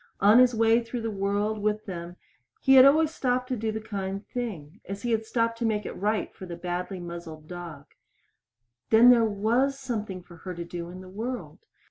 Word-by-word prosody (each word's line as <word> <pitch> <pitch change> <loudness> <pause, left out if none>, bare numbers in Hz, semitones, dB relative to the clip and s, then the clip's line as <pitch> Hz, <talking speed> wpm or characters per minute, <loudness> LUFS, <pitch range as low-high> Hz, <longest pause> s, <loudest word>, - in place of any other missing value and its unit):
On 210 +4 +6
his 250 -1 +5
way 225 +1 +4
through 230 +1 -5
the 225 0 -2
world 205 +2 -1
with 215 +1 -1
them 175 -3 -7 0.4
he 270 - +4
had 260 0 +9
always 310 +3 +4
stopped 250 -2 0
to 255 - 0
do 220 -1 -2
the 220 - -3
kind 195 -2 -5
thing 195 -12 -6
as 200 +4 -6
he 235 -2 +2
stopped 230 0 -1
to 235 - -1
make 210 -2 -1
it - - -4
right 210 +1 -1
for 185 - -10
the 170 - -6
badly 180 +2 -4
muzzled 170 -3 -8
dog. 170 -5 -8 1.0
Then 230 +3 +8
there 235 -2 +5 0.2
was 265 +5 +2
something 215 -8 -4
for 175 -1 -15
her 180 +2 -7
to 170 0 -5
do 170 0 -6
in 185 +1 -9
the 185 - -12
world. 230 +7 -6
210 Hz, 200 wpm, -27 LUFS, 180-235 Hz, 1.0 s, had